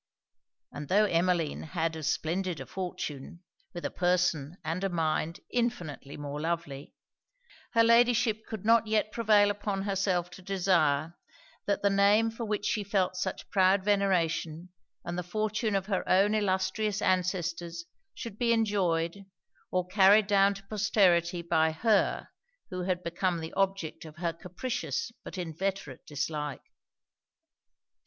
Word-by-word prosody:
And 145 0 -7
tho' 205 +6 +4
Emmeline 175 -3 +1
had 160 0 -2
as 155 -2 -2
splendid 180 +1 -2
a - - -6
fortune, 175 -3 -6 0.3
with 175 - -7
a - - -2
person 175 -3 0
and 165 +4 -3
a 195 - +1
mind 165 0 -1
infinitely 175 - -3
more 145 0 -5
lovely, 160 -4 -4 0.8
her 230 -1 +5
Ladyship 235 -1 +3
could 215 -2 -6
not 230 0 +4
yet 215 0 +1
prevail 210 -3 +4
upon 205 -1 -3
herself 190 -3 0
to - - -11
desire, 170 -5 +1 0.5
that 200 0 0
the 200 - +4
name 205 +3 +4
for 230 +1 -5
which 210 -1 -2
she 210 - 0
felt 195 -2 0
such 180 - -4
proud 190 0 +4
veneration, 180 -4 0 0.4
and 175 +1 -3
the - - -1
fortune 215 +3 -1
of 195 -1 0
her 195 -2 -1
own 200 +3 +4
illustrious 200 +1 0
ancestors, 175 -2 -1 0.3
should 225 -4 -8
be 235 -1 +2
enjoyed, 195 -4 0 0.4
or 180 -1 0
carried 200 +3 +5
down 200 -1 +3
to 195 - -11
posterity 185 -5 +2
by 160 -1 +2
her, 210 +6 +1 0.4
who 185 0 -3
had 180 -1 -1
become 170 +1 -1
the 160 0 -7
object 195 -4 -1
of 155 -1 -11
her 170 -1 -1
capricious 180 - -4
but - - -8
inveterate 180 -3 -4
dislike. 150 -1 -4
185 Hz, 140 wpm, -29 LUFS, 170-205 Hz, 0.8 s, her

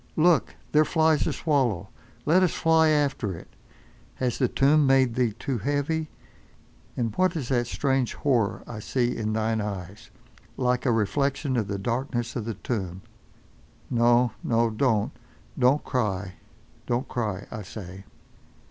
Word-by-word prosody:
Look! 170 +1 +3 0.2
there 155 +1 +5
flies 160 -1 +2
a - - +1
swallow—let 130 - 0
us 180 -4 +2
fly 160 -1 +4
after 140 - 0
it! - - -14 0.6
Has 125 -2 -2
the 125 - +3
tomb 145 +3 +3
made 130 -3 +4
thee 120 -3 +1
too 120 +2 -3
heavy? 145 +4 -1 0.9
And 115 -3 -1
what 185 -1 +2
is 140 -7 -3
that 120 -3 +1
strange 135 -1 0
horror 120 -8 0
I 115 -3 -7
see 125 +2 -1
in 110 -1 -2
thine 110 0 0
eyes—like 105 +6 -4
a - - +4
reflection 135 +5 0
of 110 -4 0
the 100 -1 -3
darkness 120 +2 -2
of 115 - -3
the 115 -2 -3
tomb? 95 -4 -4 0.9
No, 120 0 +4
no, 115 -1 +2
don't! 110 -2 +1 0.5
Don't 130 +4 +4
cry. 100 -7 -2 0.5
Don't 125 +2 -1
cry, 105 -5 -3
I 110 - -5
say! 95 -1 -9
120 Hz, 140 wpm, -26 LUFS, 110-140 Hz, 0.9 s, there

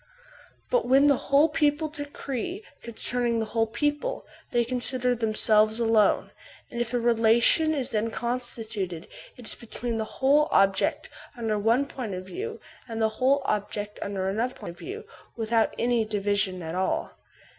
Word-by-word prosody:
But - - +2
when 270 +3 +5
the 285 -1 +5
whole 285 +3 +6
people 300 0 +1
decree 290 - -5 0.2
concerning 235 +1 0
the 225 - 0
whole 225 +1 0
people, 295 - -2 0.2
they 240 -1 +1
consider 250 +1 +1
themselves 215 -1 +3
alone; 225 -3 +3 0.4
and 240 -2 -3
if 235 -1 -2
a - - +2
relation 235 +7 +4
is 270 -2 -1
then 220 0 0
constituted 225 -7 -4 0.3
it 245 - -11
is - - +1
between 235 0 -5
the - - 0
whole 290 +3 +4
object 195 +11 +2 0.3
under 220 -3 -1
one 230 +6 +2
point 245 -8 -5
of 185 0 -6
view 440 - -6 0.3
and 225 -2 -5
the 220 -1 +3
whole 275 +2 +3
object 210 -1 -3
under 195 -2 -2
another 230 +6 -1
point - - -8
of 175 - -17
view, 410 +5 -7 0.3
without 225 0 +1
any 240 -1 +2
division 200 -3 -1
at 160 0 -5
all. 185 +1 -1
235 Hz, 155 wpm, -26 LUFS, 215-275 Hz, 0.4 s, whole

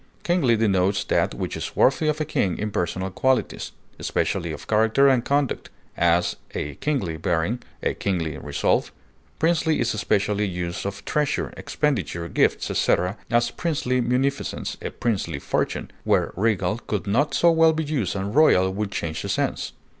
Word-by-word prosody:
Kingly 175 -10 +3
denotes 100 -2 +2
that - - +1
which - - -3
is - - -5
worthy 135 +4 +3
of 155 0 +1
a 155 - 0
king 95 -9 0
in 105 0 -3
personal 95 +1 -2
qualities, 130 +7 0 0.3
especially - - -1
of - - -7
character 110 +5 +4
and 130 -3 +4
conduct; 140 -1 0 0.3
as, 85 +1 +2 0.2
a 75 - -3
kingly 120 - -1
bearing; 90 +7 0 0.2
a - - +1
kingly 85 -6 -2
resolve. - - 0 0.5
Princely 160 -1 +2
is 120 - +1
especially 105 -1 +1
used 90 0 -3
of 100 0 -7
treasure, 150 -2 0
expenditure, 100 - -1
gifts, - - +1
etc., 90 +3 +1
as 120 +1 +2
princely 135 -7 -1
munificence, 130 +3 -1
a - - -3
princely 115 -5 -2
fortune, - - -2
where - - +1
regal 105 0 +1
could 105 -7 -3
not 125 +10 +1
so 170 - +5
well 165 0 +5
be 160 0 -1
used 140 - -1
and 100 +1 -3
royal 95 -11 +5
would 105 +1 -2
change 80 -4 -3
the - - -5
sense. - - -1
110 Hz, 160 wpm, -24 LUFS, 95-140 Hz, 0.5 s, so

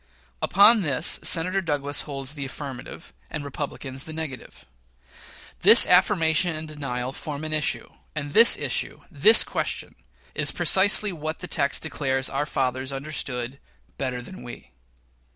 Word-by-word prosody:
Upon 205 +4 +5
this 150 -2 0
Senator 185 +3 +2
Douglas 145 -4 -1
holds 135 0 -6
the 145 -2 -6
affirmative, 135 -2 -9 0.2
and 150 -1 -6
Republicans 135 -1 -6
the 160 - -8
negative. 155 -5 -8 0.9
This - - +9
affirmation 175 -2 +2
and 155 +1 -7
denial 130 -4 -5
form 145 +2 -7
an 155 0 -5
issue, 155 -2 -2 0.3
and 145 -1 -6
this 230 +2 +7
issue - - -3
this 445 - +6
question - - -4 0.4
is - - +1
precisely 205 +1 +3
what 155 -2 -6
the 180 - -9
text 140 -5 -1
declares 135 -3 -2
our 145 +2 -2
fathers 130 -1 -2
understood 135 -2 -5 0.4
"better 125 -2 -4
than 190 +8 -11
we." 120 - -11
145 Hz, 135 wpm, -24 LUFS, 135-160 Hz, 0.9 s, This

